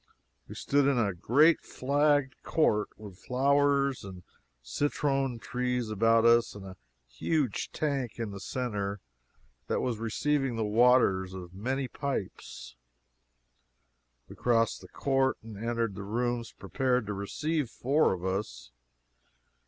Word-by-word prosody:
We - - -9
stood 140 0 +2
in 140 -2 +2
a 105 -5 +1
great 145 - +4
flagged 145 0 +1
court, 105 -10 +1
with 100 -4 -11
flowers 140 +1 +2
and 95 -2 -9 0.4
citron 135 - -1
trees 125 -1 -2
about 115 +2 +3
us, 115 -1 +4
and 100 -1 -9
a 95 -1 -9 0.3
huge 125 - -1
tank 140 -6 -2
in 115 -3 -4
the 100 - -7
centre 105 -4 -3 0.7
that - - 0
was 120 -4 -2
receiving 135 +3 0
the 110 -1 -1
waters 105 -5 +3
of 90 -1 -9
many 130 +7 -2
pipes. 135 - -5 1.5
We - - -11
crossed 115 -2 +1
the 95 - -12
court 135 +5 0
and 110 -1 -9
entered 115 0 -2
the 100 - -7
rooms 120 +3 -2
prepared 125 +5 -1
to 105 - -3
receive 140 +8 -2
four 140 +7 +2
of 95 -1 -4
us. 95 - -4
120 Hz, 130 wpm, -29 LUFS, 100-135 Hz, 1.5 s, great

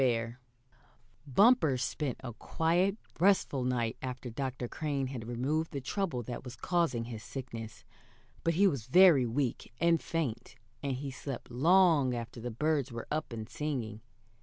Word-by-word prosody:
BEAR 120 -1 +1 0.9
Bumper 160 - +5
spent 130 +1 -2
a 120 -2 -5
quiet, 175 - +1 0.2
restful 180 -8 +3
night 120 -3 0
after 125 -1 -5
Dr. 130 0 -3
Crane 145 0 -2
had 115 -3 -6
removed 140 +7 -1
the 140 - -4
trouble 135 -2 -2
that 120 +1 -6
was 125 -1 -8
causing 165 -7 0
his 115 -2 -7
sickness; 115 -2 -7 0.6
but 165 -1 +1
he 200 +4 +5
was 140 - +1
very 165 -5 +7
weak 125 +1 -2
and 170 0 +3
faint, 160 -9 -3 0.3
and 140 -1 -1
he 135 +2 -4
slept 135 -2 -7
long 155 -1 +4
after 115 0 -6
the 120 - -3
birds 145 +2 0
were 115 -1 -6
up 155 -3 -2
and 110 -2 -5
singing. 120 -8 -4
130 Hz, 155 wpm, -31 LUFS, 120-160 Hz, 0.9 s, very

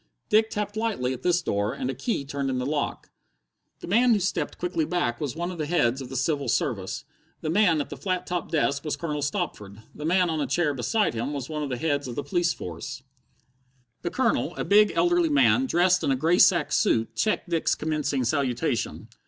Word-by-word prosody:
Dick 220 +1 +4
tapped 210 -1 -3
lightly 215 - -1
at 125 - -8
this 175 -1 +2
door, 100 -3 -1
and - - -3
a 135 - -1
key 140 - -2
turned 140 0 -3
in 130 - -1
the 125 - -2
lock. 145 +1 -3 0.7
The - - -7
man 235 +6 +4
who - - +1
stepped 170 -5 -2
quickly 175 -2 -1
back 150 -8 -1
was 145 -2 -3
one 175 +2 -3
of 175 - -8
the 155 - -2
heads 135 -6 +1
of 130 - -7
the 135 - -7
Civil 140 0 0
Service. - - -1 0.4
The 155 - -2
man 180 -4 +4
at 145 - -4
the - - -6
flat 185 -2 -2
topped 175 -3 -3
desk 140 -3 +1
was 150 -2 -2
Colonel 150 -1 -3
Stopford. 125 - -4
The 150 - -9
man 180 +3 +3
on 155 -2 -1
a - - -1
chair 165 -4 +1
beside 140 - 0
him 120 +5 -3
was 140 -1 -5
one 155 -1 -3
of 145 - -3
the 125 - -2
heads 145 0 -1
of 120 - -6
the 145 - -3
police 175 -3 +1
force. 125 - -7 1.0
The 170 - -2
Colonel, 235 +5 0
a - - -3
big, 210 +1 +5
elderly 350 -1 +3
man, 280 -2 +4
dressed 180 -2 +3
in - - +1
a 135 - +3
grey 165 +7 +2
sack 170 -5 +5
suit, 115 0 +1
checked 215 -4 0
Dick's 165 -1 +1
commencing 150 -3 -1
salutation. 125 -1 -1
155 Hz, 220 wpm, -26 LUFS, 135-180 Hz, 1.0 s, big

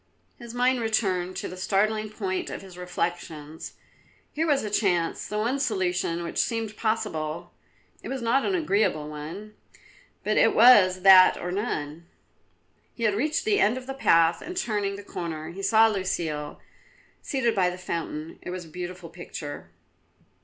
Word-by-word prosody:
His 235 -1 -9
mind 250 +1 +2
returned 190 -5 0
to - - -4
the 180 - -8
starting 215 +3 0
point 190 -3 -3
of - - -7
his 190 -2 -12
reflections. 170 -3 -5 0.6
Here 320 +2 -1
was 285 -3 +2
a 210 - -4
chance, 180 -6 0
the 210 - -4
one 240 +6 0
solution 180 -8 -1
which 170 - -3
seemed 225 -2 -1
possible; 175 -8 -2 0.5
it - - -8
was 265 -2 -4
not 250 +4 +2
an 390 - 0
agreeable 205 - +1
one, 160 +8 -8 0.7
but - - 0
it - - +4
was 200 -6 +7
that 190 -1 +8
or 180 - -4
none. 170 -6 -4 0.9
He 235 - -6
had 215 -2 +3
reached 300 - 0
the 420 -2 +2
end 220 +5 +3
of 255 - -7
the 270 - -5
path 165 -10 +3
and 360 - -7
turning 205 - -1
the 200 - -9
corner 170 -5 -6
saw 220 +3 +5
Lucile 170 -8 -2 0.6
seated 250 -5 0
by 185 -4 +2
the 180 - -6
fountain. 165 -3 -5
It - - -7
was 180 -1 -5
a - - -14
beautiful 180 0 -7
picture. 145 - -8
195 Hz, 160 wpm, -26 LUFS, 170-225 Hz, 0.9 s, that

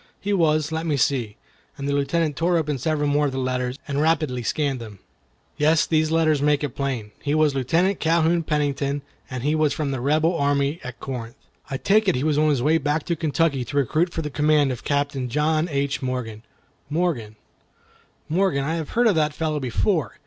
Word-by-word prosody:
"He 205 +1 -2
was—let 160 -2 +1
me 150 -3 +1
see—" 125 -6 0 0.4
and 140 - -4
the 140 - 0
Lieutenant 145 +2 0
tore 170 +3 +1
open 150 -4 -1
several 150 +2 0
more 145 +1 +2
of - - -3
the 130 - -5
letters, 130 0 -2
and 140 0 -1
rapidly 155 -5 +1
scanned 135 +3 -1
them—"yes, 100 - -2
these 155 -1 +1
letters 155 -3 +2
make 145 0 +2
it 145 - 0
plain. 125 -5 -4
He 145 +1 0
was 155 -2 +3
a - - -3
Lieutenant 170 +9 +1
Calhoun 165 +1 +2
Pennington, 145 -2 -1 0.3
and 125 -2 -5
he 150 +2 +1
was 155 -2 +2
from 145 -2 -2
the 130 -2 -3
Rebel 155 +5 +2
army 145 +1 +1
at 125 0 -8
Corinth. 120 -3 -6 0.3
I 135 - -2
take 210 +7 +2
it 185 - +3
he 125 - -1
was 150 -1 +2
on 155 0 +3
his 135 -5 +1
way 160 +3 +3
back 150 +1 -1
to 170 - -1
Kentucky 155 -3 0
to 145 +4 -5
recruit 155 +6 +1
for 165 - -3
the 150 - -4
command 150 -1 +3
of 125 - -4
a - - -15
Captain 140 -3 -1
John 155 +4 +1
H. 140 0 -1
Morgan. 125 -4 -4 0.5
Morgan—Morgan, 155 - -3
I 160 +4 -1
have 160 -3 -5
heard 240 - +4
of 220 - +5
that 155 -3 +1
fellow 155 -2 -1
before. 130 - 0
145 Hz, 200 wpm, -23 LUFS, 135-160 Hz, 0.5 s, of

